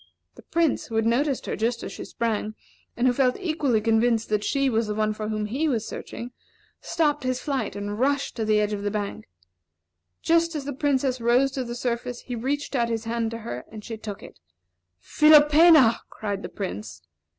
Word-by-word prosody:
The - - -14
Prince, 330 -3 0
who 225 - -6
had 225 0 +2
noticed 265 +4 +1
her - - -2
just 230 +2 -1
as - - -5
she - - -7
sprang, 215 -2 -2 0.4
and 240 - +1
who 250 - +4
felt 250 -1 +2
equally 310 - +1
convinced 225 +1 +2
that 210 -1 0
she 275 +3 +1
was 225 -3 +1
the 210 - -2
one 215 0 +1
for 215 0 -5
whom 215 -1 -2
he 265 +9 -1
was 230 -6 -1
searching, 240 +1 -7 0.5
stopped 305 -5 0
his 255 0 -1
flight 270 -4 -2
and 205 +1 -4
rushed 280 +2 0
to 225 - -1
the 215 0 +3
edge 210 0 0
of 205 - -3
the 205 - -1
bank. 205 -1 -4 1.0
Just 335 0 +2
as 290 -3 -4
the 285 - -3
Princess 265 -2 0
rose 245 +4 +3
to 265 -1 -3
the 240 -1 -6
surface, 245 0 -3
he 250 - -6
reached 280 +5 -2
out 235 -2 +1
his 225 -1 -2
hand 230 0 -1
to 230 - -5
her, 125 - -5
and 215 -1 -9
she 225 - -5
took 210 -2 -8
it. - - -13 0.6
"Philopena!" 300 - +6
cried 200 -2 -4
the - - -6
Prince. 105 - -6
235 Hz, 205 wpm, -25 LUFS, 215-275 Hz, 1.0 s, Philopena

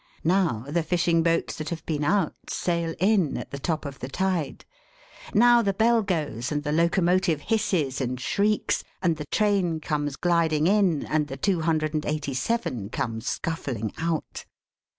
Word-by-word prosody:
Now, 165 - +1
the 165 +4 0
fishing 170 0 +2
boats 165 0 +1
that 155 0 -4
have 170 -2 -5
been 150 -2 -1
out, 185 +1 +2 0.2
sail 170 -2 -1
in 190 -5 +2
at - - -7
the 140 - -5
top 155 +1 -2
of 140 -1 -7
the 130 - -5
tide. 180 -1 -2 0.7
Now, 240 +2 +6
the 200 -3 0
bell 230 +2 +4
goes, 155 - -2
and 145 -1 -1
the 150 - -2
locomotive 170 0 +2
hisses 170 - 0
and 130 0 -2
shrieks, 205 +10 0 0.2
and 170 -3 +2
the 150 -1 -6
train 195 -6 +1
comes 145 -2 -2
gliding 165 -2 +2
in, 190 -5 +3
and 155 -1 0
the 135 - -6
two 180 +4 +1
hundred 155 -1 0
and 155 -1 -1
eighty 150 -2 -2
seven 130 - -2
come 115 0 -3
scuffling 125 -8 -3
out. 165 -1 -3
165 Hz, 170 wpm, -26 LUFS, 145-185 Hz, 0.7 s, Now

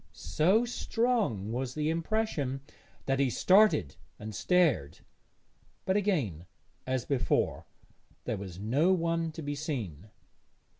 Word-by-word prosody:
So 175 - +2
strong 225 - 0
was 125 +1 -3
the 155 +1 0
impression 165 -7 -1 0.4
that 135 0 0
he 140 -2 +3
started 185 - +4 0.2
and 110 +1 -7
stared; 150 - +1 0.8
but 190 - +1
again, 140 - 0 0.4
as 130 -2 -1
before, 140 -3 0 0.6
there - - -2
was 95 -3 -8
no 140 - +2
one 165 -2 0
to 160 - -7
be 145 0 -3
seen. 115 - -5
145 Hz, 115 wpm, -30 LUFS, 110-180 Hz, 0.8 s, started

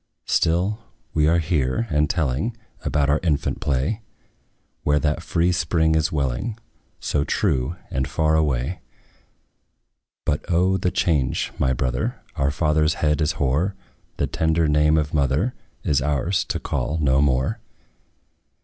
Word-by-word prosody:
Still 90 +6 +1 0.3
we 75 -1 +3
are 85 +2 +4
here, 80 - 0
and 75 0 +2
telling 85 - -1 0.3
About 75 -2 +1
our 75 +1 +3
infant 80 -5 0
play; 70 - 0 0.8
Where 75 0 +2
that 75 0 0
free 85 +2 +1
spring 80 -2 +2
is 80 0 +1
welling, 75 - -1 0.4
So 70 - 0
true, 65 +2 0 0.2
and 65 -1 -1
far 80 -1 +1
away. 75 +1 0 1.4
But 75 - 0
O! 90 +2 +3
the 90 0 0
change, 80 -7 0
my 65 - +2
brother! 65 0 -1 0.2
Our 70 0 +1
father's 75 +1 +2
head 75 0 +1
is 75 +1 +1
hoar; 75 +8 0 0.4
The - - +1
tender 80 0 +1
name 75 +1 +4
of 75 +1 -1
mother 75 - +1 0.3
Is 70 -2 +2
ours 75 +6 0
to - - -2
call 70 +6 -2
no 70 -2 +3
more. 65 -2 +1
75 Hz, 140 wpm, -23 LUFS, 70-85 Hz, 1.4 s, are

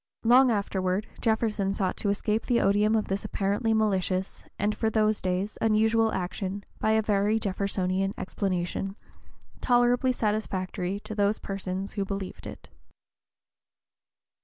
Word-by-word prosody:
Long 250 +3 +6
afterward 195 -2 0 0.2
Jefferson 220 -3 +1
sought 190 -2 -1
to 205 - 0
escape 210 +2 -1
the 240 -2 +3
odium 210 +2 +3
of 215 - 0
this 195 +1 -2
apparently 210 +2 0
malicious 190 -3 0
and, 210 +2 +1
for 220 +1 0
those 215 -1 +1
days, 185 +3 -2
unusual 220 +1 +3
action, 190 +2 -3 0.2
by 220 - +2
a 220 0 +3
very 210 +1 +2
Jeffersonian 195 -1 -1
explanation, 190 0 -2 0.7
tolerably 245 +1 +3
satisfactory 200 -4 -2
to 215 - -7
those 205 0 +1
persons 195 0 -4
who 200 - -1
believed 195 -1 -5
it. - - -10
205 Hz, 130 wpm, -27 LUFS, 195-220 Hz, 0.7 s, Long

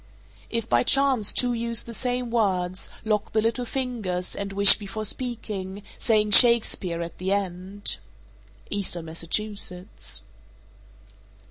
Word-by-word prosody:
452. 230 - -2
If 230 - -3
by 120 0 +3
chance 270 - +3
two 245 -1 +2
use 235 -1 +1
the 235 - -8
same 245 0 -1
words, 185 -5 0 0.2
lock 210 -1 -1
the 220 - +3
little 235 +2 0
fingers, 225 -10 -2
and 200 -1 -4
wish 200 +1 +6
before 215 +1 -5
speaking, 205 -5 -3 0.2
saying 215 -3 +2
"Shakespeare" 205 -7 +5
at 170 - -9
the 185 +1 -2
end. 195 0 -1 0.7
_Eastern 190 -4 -2
Massachusetts. 180 +3 -3
205 Hz, 125 wpm, -25 LUFS, 185-235 Hz, 0.7 s, wish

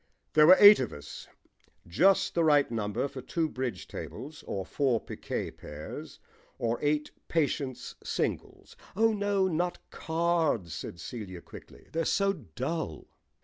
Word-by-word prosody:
There 155 0 +7
were 185 +2 +9
eight 205 0 +10
of 130 - -2
us; 75 0 -9 0.6
just 195 - +3
the 170 - +2
right 145 -5 +4
number 110 +3 -1
for 135 -1 -8
two 165 +3 -1
bridge 130 -4 -4
tables, 145 +3 -8
or 95 -1 -3
four 130 0 +1
picquet - - -5
pairs, 75 +1 -9 0.4
or 115 0 -1
eight 150 0 0 0.2
patience 140 -5 -1
singles. - - -3 0.2
"Oh, 225 +2 +3
no, 205 -2 +1
not 175 0 -1
cards," 160 - 0
said 85 +1 -7
Celia 95 -7 -7
quickly. - - -14
"They're 165 +1 0
so 195 0 +2
dull." 130 - -5
145 Hz, 140 wpm, -29 LUFS, 115-170 Hz, 0.6 s, eight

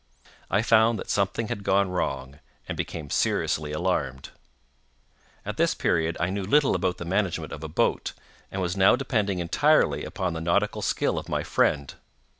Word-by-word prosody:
I 100 +3 +2
found 115 0 +4
that - - -5
something 100 +3 0
had 100 - -4
gone 95 -1 +2
wrong, 70 -5 -3 0.3
and - - -3
became 75 -3 -5
seriously 75 -1 0
alarmed. 75 -5 -2 1.2
At - - -4
this - - +2
period 80 0 0
I 85 +1 0
knew 100 +1 -2
little 140 +9 +3
about 95 -2 0
the 85 - -6
management 85 -3 -1
of 80 - -8
a 80 - -5
boat, 75 - 0 0.4
and 95 -1 -2
was 90 +1 -2
now 95 +3 +5
depending 110 -7 -1
entirely 85 -1 +2
upon 90 -2 -3
the 80 - -4
nautical 100 +6 +1
skill - - 0
of - - -10
my - - -1
friend. 70 -2 +1
90 Hz, 170 wpm, -26 LUFS, 80-100 Hz, 1.2 s, now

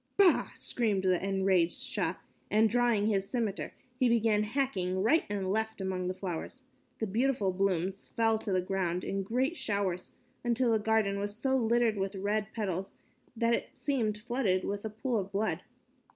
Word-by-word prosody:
"Bah!" 390 -4 +5
screamed 210 -6 0
the 185 -1 +2
enraged 190 -3 +2
Shah - - -1 0.3
and, 220 +1 +4
drawing 240 -3 +3
his 195 -2 +1
scimitar, 225 -6 -2 0.3
he 255 -2 +4
began 225 -2 +3
hacking 210 -6 -1
right 315 +10 +4
and 195 -2 -1
left 220 +1 0
among 185 -1 -2
the 185 - -2
flowers. 190 +8 -5 0.3
The 220 - -1
beautiful 220 -1 +1
blooms 190 0 -1
fell 225 -1 +1
to 210 - -4
the 185 -1 +2
ground 180 -1 -1
in 195 0 -2
great 255 - 0
showers 200 -6 -2 0.3
until 240 0 +2
the 220 - +3
garden 210 -2 +1
was 205 +1 -3
so 265 +4 0
littered 235 -2 +2
with 195 +1 -1
the 195 - -6
red 205 +1 0
petals 195 -4 -3 0.4
that 230 +1 +2
it 270 - -3
seemed 245 -6 0
flooded 220 -5 0
with 200 0 -3
a - - -2
pool 225 +3 -2
of 195 0 -5
blood. 210 +2 0
210 Hz, 175 wpm, -31 LUFS, 190-235 Hz, 0.4 s, Bah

